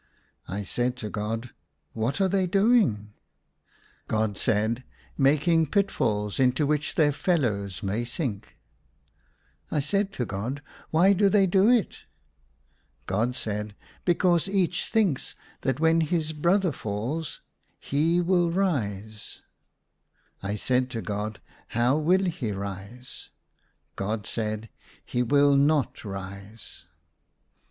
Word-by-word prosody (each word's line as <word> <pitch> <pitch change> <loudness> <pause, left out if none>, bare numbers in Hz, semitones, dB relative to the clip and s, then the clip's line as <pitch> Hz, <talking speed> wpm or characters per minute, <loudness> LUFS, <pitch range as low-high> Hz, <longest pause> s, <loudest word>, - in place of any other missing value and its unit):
I 100 +3 -3
said 125 +5 -1
to 105 -4 -5
God, 115 +3 -3 0.2
*' 70 0 -47
What 130 - 0
are 195 - +4
they 190 0 +1
doing? 195 - +3 0.4
" - - -35
God 110 -2 0
said, 110 +4 +1 0.2
" - - -30
Making 155 +4 +3
pitfalls 120 - 0
into 130 +3 +3
which 150 0 0
their 150 -2 +4
fellows 110 - -1
may 100 +4 -1
sink." 120 - -4 1.1
I - - 0
said 195 +7 0
to 125 - -2
God, 120 +9 -4
" - - -23
Why 180 +5 +5
do 200 +1 +4
they 200 -1 +4
do 190 +4 +4
it?" 240 -7 +1 1.0
God 115 +6 0
said, 105 -2 -3
'* - - -27
Because 175 0 +2
each 185 -3 0
thinks 205 - +1 0.3
that 130 0 -1
when 165 +1 +4
his 160 0 0
brother 175 +4 +2
falls 125 +7 -4 0.4
he 160 +5 +1
will 175 -1 +2
rise." 110 - -2 1.0
I 100 +1 -2
said 125 +4 +1
to 115 -3 -4
God, 105 0 -3 0.2
" - - -30
How 120 +3 +4
will 180 +5 +3
he 160 - -2
rise 100 +5 -7 0.3
?" - - -41 0.3
God 105 +1 -3
said, 110 0 -3 0.2
" - - -27
He 125 - -1
will 140 +3 +4
not 145 0 +2
rise." 100 +1 -8
130 Hz, 135 wpm, -26 LUFS, 105-170 Hz, 1.1 s, Why